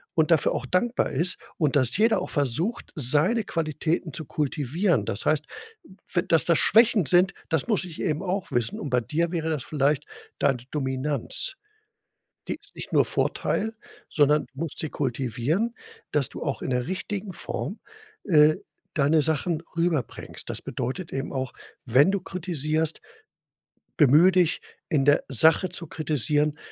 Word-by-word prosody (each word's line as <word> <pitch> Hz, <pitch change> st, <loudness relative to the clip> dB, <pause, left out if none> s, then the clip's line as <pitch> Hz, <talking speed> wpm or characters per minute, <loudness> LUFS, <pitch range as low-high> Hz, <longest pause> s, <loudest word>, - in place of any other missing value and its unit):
und 160 Hz, -1 st, +3 dB
dafür 160 Hz, -5 st, +4 dB
auch 130 Hz, -, -3 dB
dankbar 230 Hz, -, 0 dB
ist, 175 Hz, +2 st, 0 dB, 0.2 s
und 150 Hz, -4 st, +1 dB
dass 130 Hz, -3 st, +1 dB
jeder 225 Hz, +1 st, +3 dB
auch -, -, -5 dB
versucht, 150 Hz, -, -1 dB
seine 155 Hz, -, +2 dB
Qualitäten 160 Hz, 0 st, -2 dB
zu 155 Hz, -, -4 dB
kultivieren. 150 Hz, -, 0 dB
Das 100 Hz, -, -3 dB
heißt, 155 Hz, -1 st, +2 dB, 0.7 s
we 175 Hz, -, +3 dB
dass 165 Hz, -4 st, +3 dB
das 170 Hz, -2 st, +3 dB
Schwächen 220 Hz, -4 st, +4 dB
sind, 180 Hz, +4 st, +4 dB, 0.2 s
das 160 Hz, -, 0 dB
muss 210 Hz, -4 st, +3 dB
ich 170 Hz, -3 st, -7 dB
eben 155 Hz, -1 st, -1 dB
auch 190 Hz, 0 st, -2 dB
wissen. 120 Hz, -1 st, 0 dB
Und 145 Hz, -, -5 dB
bei 125 Hz, 0 st, +3 dB
dir 165 Hz, +7 st, -1 dB
wäre 160 Hz, -2 st, -1 dB
das 150 Hz, -5 st, -1 dB
vielleicht 145 Hz, 0 st, +1 dB, 0.3 s
deine 135 Hz, -3 st, +2 dB
Dominanz. 135 Hz, -, -2 dB, 0.9 s
Die -, -, -2 dB
ist -, -, -21 dB
nicht -, -, -8 dB
nur -, -, +5 dB
Vorteil, 220 Hz, +1 st, -1 dB, 0.4 s
sondern 150 Hz, 0 st, +3 dB
du 135 Hz, -, -13 dB
musst 165 Hz, -3 st, -3 dB
sie 160 Hz, -, -3 dB
kultivieren, 135 Hz, -, -1 dB, 0.4 s
dass 145 Hz, -3 st, +1 dB
du -, -, -9 dB
auch 140 Hz, -3 st, -2 dB
in -, -, -3 dB
'ner 125 Hz, +1 st, 0 dB
richtigen 190 Hz, +1 st, -4 dB
Form, 205 Hz, -, -5 dB, 0.5 s
äh, 155 Hz, -4 st, +5 dB, 0.4 s
deine 155 Hz, +1 st, +3 dB
Sachen 160 Hz, +1 st, 0 dB
rüberbringst. 165 Hz, -8 st, -2 dB
Das -, -, -5 dB
bedeutet 130 Hz, +8 st, -4 dB
eben 135 Hz, +2 st, -3 dB
auch, 130 Hz, -2 st, -3 dB, 0.3 s
wenn 135 Hz, +10 st, +5 dB
du 200 Hz, -, +1 dB
kritisierst, 160 Hz, -4 st, -2 dB, 1.0 s
bemühe 155 Hz, +6 st, +6 dB
dich 180 Hz, -2 st, +2 dB, 0.3 s
in 140 Hz, -3 st, +2 dB
der 145 Hz, 0 st, +4 dB
Sache 160 Hz, -, +4 dB
zu 170 Hz, -, -3 dB
kritisieren, 150 Hz, 0 st, 0 dB
155 Hz, 155 wpm, -25 LUFS, 140-175 Hz, 1.0 s, bemühe